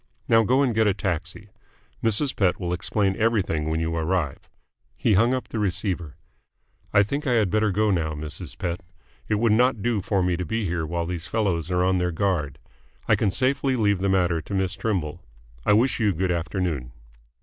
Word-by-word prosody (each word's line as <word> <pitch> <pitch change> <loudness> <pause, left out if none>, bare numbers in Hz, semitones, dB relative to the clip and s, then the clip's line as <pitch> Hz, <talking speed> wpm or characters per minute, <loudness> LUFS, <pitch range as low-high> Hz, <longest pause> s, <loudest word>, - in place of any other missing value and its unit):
Now 115 0 +5
go 130 +6 +3
and 125 -4 +1
get 110 0 +3
a 100 - +2
taxi. 100 +2 -4 0.5
Mrs. 115 +6 +1
Pett 95 -4 +1
will 90 -1 -2
explain 95 +2 0
everything 100 -9 +1
when 80 0 0
you 80 0 -1
arrive." 80 -3 -2 0.5
He 110 - +2
hung 115 +5 +4
up 130 - -5
the 110 - -3
receiver. 90 -5 -2 0.8
"I 100 - +5
think 140 +8 -3
I 125 - +2
had 110 -6 +2
better 110 0 +2
go 105 +2 +2
now, 80 -4 0
Mrs. 80 +2 -6
Pett. 85 -2 -3 0.5
It 105 - +1
would 115 +1 +2
not 120 -1 +3
do 115 -4 +1
for 95 0 0
me 90 -1 +1
to 90 - -2
be 110 +6 -2
here 85 -3 -2
while 85 +1 -2
these 85 0 -4
fellows 95 -7 -1
are 90 0 +1
on 95 0 +2
their 90 0 0
guard. 85 -5 -1 0.5
I - - +5
can 105 - +1
safely 130 +4 +1
leave 100 -5 +2
the 100 +1 0
matter 90 -3 +2
to 100 +6 -6
Miss 95 -1 0
Trimble. 90 -6 -2 0.4
I - - +6
wish 120 +6 +3
you 105 -3 +2
good 90 +2 0
afternoon." 85 -7 -2
95 Hz, 200 wpm, -24 LUFS, 85-110 Hz, 0.8 s, I